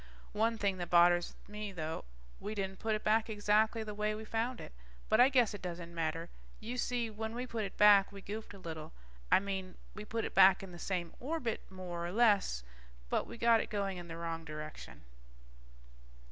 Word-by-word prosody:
One 225 Hz, +2 st, +1 dB
thing 200 Hz, -3 st, 0 dB
that 175 Hz, -1 st, -4 dB
bothers 175 Hz, 0 st, +5 dB
me 210 Hz, 0 st, -5 dB
though, 160 Hz, -, -4 dB, 0.3 s
we 210 Hz, +1 st, -5 dB
didn't 195 Hz, -1 st, -3 dB
put 220 Hz, -1 st, 0 dB
it 215 Hz, -, -5 dB
back 220 Hz, +1 st, +2 dB
exactly 215 Hz, +1 st, +2 dB
the 210 Hz, -1 st, -6 dB
way 210 Hz, +1 st, -1 dB
we 220 Hz, +1 st, -7 dB
found 230 Hz, +3 st, -2 dB
it. -, -, -9 dB, 0.4 s
But 220 Hz, -, +4 dB
I 255 Hz, -, +7 dB
guess 245 Hz, -6 st, +3 dB
it 205 Hz, -, -7 dB
doesn't 170 Hz, -1 st, -6 dB
matter. 165 Hz, 0 st, -2 dB, 0.3 s
You 240 Hz, +3 st, -5 dB
see, 240 Hz, -3 st, -1 dB
when 220 Hz, +1 st, -5 dB
we 250 Hz, +1 st, -3 dB
put 230 Hz, -4 st, -3 dB
it 195 Hz, -, -8 dB
back, 205 Hz, -1 st, +7 dB
we 200 Hz, -, -9 dB
goofed 205 Hz, +1 st, -7 dB
a -, -, -10 dB
little. 160 Hz, -4 st, -7 dB, 0.4 s
I -, -, +7 dB
mean, 190 Hz, -2 st, -4 dB, 0.2 s
we 210 Hz, -, -7 dB
put 225 Hz, +1 st, -3 dB
it -, -, -5 dB
back 190 Hz, 0 st, +7 dB
in 190 Hz, -, -8 dB
the 175 Hz, -, -10 dB
same 175 Hz, -3 st, -3 dB
orbit, 260 Hz, -4 st, -2 dB
more 180 Hz, -2 st, -6 dB
or 170 Hz, -, -3 dB
less, 205 Hz, -, +3 dB, 0.5 s
but -, -, +1 dB
we 235 Hz, -, -9 dB
got 230 Hz, -1 st, +5 dB
it -, -, -6 dB
going 200 Hz, -3 st, -2 dB
in 175 Hz, -, -9 dB
the 165 Hz, -1 st, -7 dB
wrong 165 Hz, -1 st, -4 dB
direction. 155 Hz, -1 st, -8 dB
205 Hz, 205 wpm, -33 LUFS, 175-220 Hz, 0.5 s, I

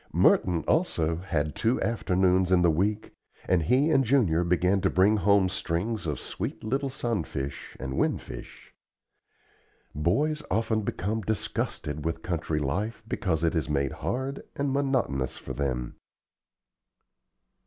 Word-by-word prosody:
Merton, 90 Hz, -3 st, +3 dB
also, 85 Hz, -, +1 dB
had 80 Hz, -4 st, -2 dB
two 115 Hz, +3 st, +1 dB
afternoons 95 Hz, -4 st, +2 dB
in 90 Hz, -1 st, +5 dB
the 85 Hz, -, +5 dB
week 100 Hz, +7 st, 0 dB, 0.4 s
and 90 Hz, -2 st, +3 dB
he 130 Hz, -, +3 dB
and 135 Hz, -3 st, +4 dB
Junior 110 Hz, -10 st, +3 dB
began 90 Hz, +3 st, +2 dB
to 95 Hz, -, +2 dB
bring 100 Hz, +4 st, +4 dB
home 100 Hz, -1 st, +4 dB
strings 95 Hz, +2 st, -2 dB
of 75 Hz, -4 st, -2 dB
sweet -, -, -5 dB
little 135 Hz, +5 st, -1 dB
sunfish 85 Hz, -, -4 dB
and 65 Hz, 0 st, -3 dB
winfish. -, -, -4 dB, 1.2 s
Boys 145 Hz, -, +1 dB
often 110 Hz, 0 st, +1 dB
become 105 Hz, +2 st, -2 dB
disgusted 75 Hz, -7 st, -3 dB
with 80 Hz, 0 st, -3 dB
country 80 Hz, -3 st, -2 dB
life 100 Hz, +11 st, -2 dB
because 85 Hz, -7 st, -1 dB
it 80 Hz, -, +2 dB
is 80 Hz, -3 st, -1 dB
made 70 Hz, -2 st, 0 dB
hard 135 Hz, +2 st, -3 dB
and 140 Hz, -1 st, -1 dB
monotonous 130 Hz, -, 0 dB
for -, -, -7 dB
them. 65 Hz, -4 st, -2 dB
95 Hz, 130 wpm, -27 LUFS, 80-115 Hz, 1.2 s, in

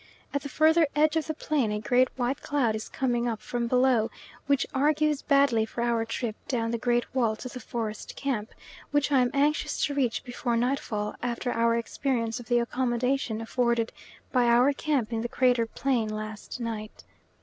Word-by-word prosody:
At 285 Hz, -, 0 dB
the 285 Hz, -, -6 dB
further 315 Hz, +2 st, +4 dB
edge 305 Hz, +1 st, +3 dB
of 320 Hz, -, 0 dB
the 315 Hz, -, -2 dB
plain 285 Hz, -8 st, 0 dB
a 210 Hz, -, -1 dB
great 250 Hz, +4 st, +3 dB
white 250 Hz, +2 st, -1 dB
cloud 270 Hz, -6 st, +1 dB
is 215 Hz, -, -5 dB
coming 245 Hz, -2 st, 0 dB
up 225 Hz, -2 st, -2 dB
from 235 Hz, +2 st, -3 dB
below, 250 Hz, -2 st, +3 dB, 0.4 s
which 280 Hz, -1 st, +2 dB
argues 300 Hz, +1 st, +2 dB
badly 275 Hz, -6 st, +3 dB
for 235 Hz, +2 st, -3 dB
our 235 Hz, -1 st, +1 dB
trip 225 Hz, -1 st, -3 dB
down 230 Hz, -3 st, -1 dB
the 235 Hz, -, -1 dB
great 240 Hz, +1 st, 0 dB
wall 235 Hz, -4 st, +2 dB
to 235 Hz, -, -7 dB
the 255 Hz, 0 st, -7 dB
forest 220 Hz, -2 st, -5 dB
camp, 240 Hz, -6 st, -2 dB, 0.4 s
which 290 Hz, 0 st, +1 dB
I 275 Hz, -, +5 dB
am 250 Hz, -, +2 dB
anxious 295 Hz, +2 st, +1 dB
to 290 Hz, -, -3 dB
reach 260 Hz, -5 st, 0 dB
before 245 Hz, -2 st, -2 dB
nightfall 230 Hz, -4 st, -1 dB
after 245 Hz, 0 st, -2 dB
our 230 Hz, 0 st, +2 dB
experience 235 Hz, 0 st, -1 dB
of 240 Hz, -, -11 dB
the 240 Hz, -, +3 dB
accommodation 240 Hz, -1 st, 0 dB
afforded 235 Hz, 0 st, 0 dB, 0.4 s
by 250 Hz, -2 st, +3 dB
our 245 Hz, +4 st, +5 dB
camp 275 Hz, -6 st, -1 dB
in 225 Hz, -, -1 dB
the 240 Hz, -, -3 dB
crater 245 Hz, -2 st, +2 dB
plain 240 Hz, -2 st, 0 dB
last 215 Hz, +2 st, -6 dB
night. 220 Hz, -2 st, -5 dB
245 Hz, 185 wpm, -27 LUFS, 230-275 Hz, 0.4 s, I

